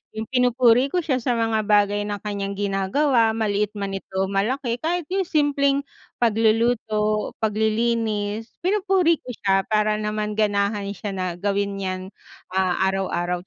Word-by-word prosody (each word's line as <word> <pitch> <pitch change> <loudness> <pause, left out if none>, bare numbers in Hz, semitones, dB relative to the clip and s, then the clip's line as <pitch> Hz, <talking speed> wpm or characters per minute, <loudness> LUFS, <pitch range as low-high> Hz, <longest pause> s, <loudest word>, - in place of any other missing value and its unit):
Yung 220 - -3
pinupuri 250 0 +4
ko 355 +5 -1
siya 270 -5 0
sa 245 0 0
mga 225 -2 0
bagay 205 0 +2
na 205 - -2
kanyang 200 -1 -3
ginagawa, 220 +5 +1
maliit 210 -1 -1
man 200 -1 -3
ito 195 0 -7
o 195 - -3
malaki. 235 +5 -1
Kahit 345 +4 -1
yung 380 -1 0
simpleng 280 -3 +2 0.3
pagluluto, 220 -1 +1
paglilinis, 220 0 0
pinupuri 375 -4 +2
ko 250 -2 -8
siya 195 -2 +1
para 215 0 +1
naman 210 0 -2
ganahan 205 -1 0
siya 205 +2 -5
na 185 -1 -3
gawin 200 +2 -1
yan, 185 -1 -4 0.5
ah, 185 -2 +1
araw-araw. 180 -2 -1
215 Hz, 145 wpm, -23 LUFS, 200-245 Hz, 0.5 s, pinupuri